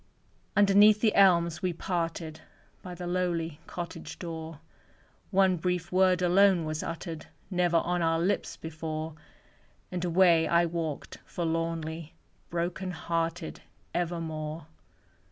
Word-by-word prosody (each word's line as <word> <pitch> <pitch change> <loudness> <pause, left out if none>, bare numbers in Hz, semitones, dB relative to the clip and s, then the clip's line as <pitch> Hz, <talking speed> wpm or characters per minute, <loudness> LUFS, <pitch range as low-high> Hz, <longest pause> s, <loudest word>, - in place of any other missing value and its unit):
Underneath 205 +1 +6
the 215 -1 +3
elms 170 -4 +4
we 185 -2 0
parted, 165 -2 -3 0.4
By 180 -1 -8
the 175 +1 -6
lowly 170 -3 -1
cottage 170 -2 -6
door; 165 -3 -6 0.7
One 190 -2 +3
brief 180 0 -2
word 185 -1 +3
alone 180 -1 +4
was 155 0 -3
uttered 165 -1 -6 0.2
Never 175 -2 +2
on 175 +1 0
our 165 -1 +2
lips 185 +5 -1
before; 160 0 -5 0.8
And 180 -1 -3
away 170 -2 +4
I 170 0 +4
walked 165 -3 -4
forlornly, 165 -1 -3 0.3
Broken 175 +2 -2
hearted 165 -1 -3 0.3
evermore. 160 -3 -3
170 Hz, 115 wpm, -29 LUFS, 165-180 Hz, 0.8 s, Underneath